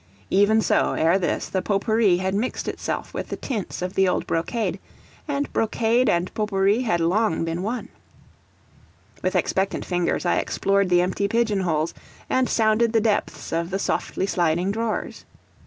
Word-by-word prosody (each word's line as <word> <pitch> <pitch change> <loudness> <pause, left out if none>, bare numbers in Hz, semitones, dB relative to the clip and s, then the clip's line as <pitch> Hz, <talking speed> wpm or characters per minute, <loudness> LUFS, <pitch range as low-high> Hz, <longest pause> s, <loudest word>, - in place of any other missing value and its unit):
Even 205 +3 +4
so, - - +2
ere 165 +4 +3
this, 175 - -1
the 190 - -1
pot 200 +1 0
pourri 220 -5 +3
had 190 +1 -1
mixed 220 +6 -2
itself - - -4
with - - -4
the - - -4
tints 210 -8 -4
of 180 +1 -3
the 190 0 +3
old - - 0
brocade, 190 +3 -1 0.5
and 285 -1 -2
brocade 225 +2 +2
and 175 +1 0
pot 210 -1 -2
pourri 200 +3 +2
had 195 -9 +1
long 170 +1 +1
been 165 +1 -3
one. 225 +2 -3 1.3
With - - -1
expectant 190 +1 0
fingers 180 0 -1
I 175 - +2
explored 200 -1 +1
the 175 0 +4
empty 185 +2 0
pigeon 220 -2 +1
holes 160 -3 0 0.4
and 260 -1 +2
sounded 220 +1 +2
the 225 - +4
depths 210 -1 -1
of 170 +1 -1
the 190 - -1
softly 195 - -1
sliding 175 0 +1
drawers. 225 +1 -3
200 Hz, 170 wpm, -23 LUFS, 180-220 Hz, 1.3 s, Even